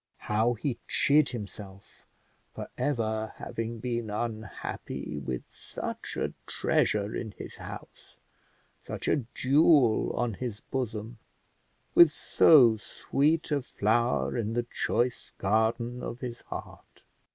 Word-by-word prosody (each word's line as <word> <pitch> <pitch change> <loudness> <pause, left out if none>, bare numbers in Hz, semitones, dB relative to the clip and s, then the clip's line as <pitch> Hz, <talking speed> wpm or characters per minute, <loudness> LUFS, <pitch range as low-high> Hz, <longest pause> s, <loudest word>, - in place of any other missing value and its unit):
How 110 +3 +2
he 120 +1 -3
chid 145 0 +4
himself 100 -3 -9 0.4
for - - -8
ever 110 -6 -1
having 115 +1 -4
been 120 -1 -3
unhappy 110 -1 -4
with 65 -1 -4
such - - -6
a - - -1
treasure 105 0 +1
in 110 -3 -4
his - - -8
house, - - -10 0.6
such - - -5
a 140 -6 +2
jewel 140 -3 +4
on 120 -2 -1
his 115 -1 -5
bosom, 115 -3 -4 0.7
with 170 -2 +9
so 130 -6 +6
sweet 150 +9 0
a 145 -1 +2
flower 120 +1 +1
in 115 -2 -1
the 120 +1 +1
choice 120 -1 -1
garden 115 +4 +1
of 120 - -5
his 120 -2 -5
heart! - - -9
115 Hz, 120 wpm, -29 LUFS, 110-125 Hz, 0.7 s, with